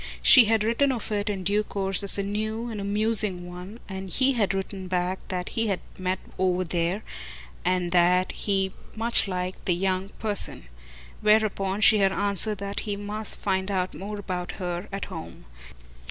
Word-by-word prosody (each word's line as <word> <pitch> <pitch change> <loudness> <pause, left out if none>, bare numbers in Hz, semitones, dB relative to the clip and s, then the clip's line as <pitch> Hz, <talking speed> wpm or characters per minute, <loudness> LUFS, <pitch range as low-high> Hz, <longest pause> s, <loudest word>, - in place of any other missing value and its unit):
She 255 -4 +9
had 220 0 +2
written 235 +5 +2
of 235 -4 -4
it 205 0 -1
in 195 -2 -3
due 205 +3 +2
course 195 -2 0
as 200 0 +1
a 200 - 0
new 215 +3 -3
and 215 -3 -5
amusing 205 -3 +2
one, 180 +5 -9
and 190 -1 -6
he 260 +7 +4
had 220 -7 +1
written 195 -1 -4
back 180 +1 -1
that 180 -1 -3
he 225 0 0
had 195 -3 0 0.2
met 185 0 -1 0.2
over 185 -1 +2
there, 175 +3 -1 0.6
and 180 -1 0
that 180 +1 +4
he 195 -2 0 0.2
much 230 0 +3
liked, 185 -1 -3
the 175 - +3
young 190 +1 -1
person; 210 -2 -1 0.6
whereupon 210 -2 +2
she 215 0 +7
had 195 -1 +4
answered 205 +2 -1
that 200 +1 -3
he 205 -2 -3
must 205 +1 -1
find 190 -1 -1
out 185 -2 -1
about 190 -3 -5
her 180 +1 -4
at 195 0 -4
home. 165 -5 -9
195 Hz, 170 wpm, -26 LUFS, 185-210 Hz, 0.6 s, She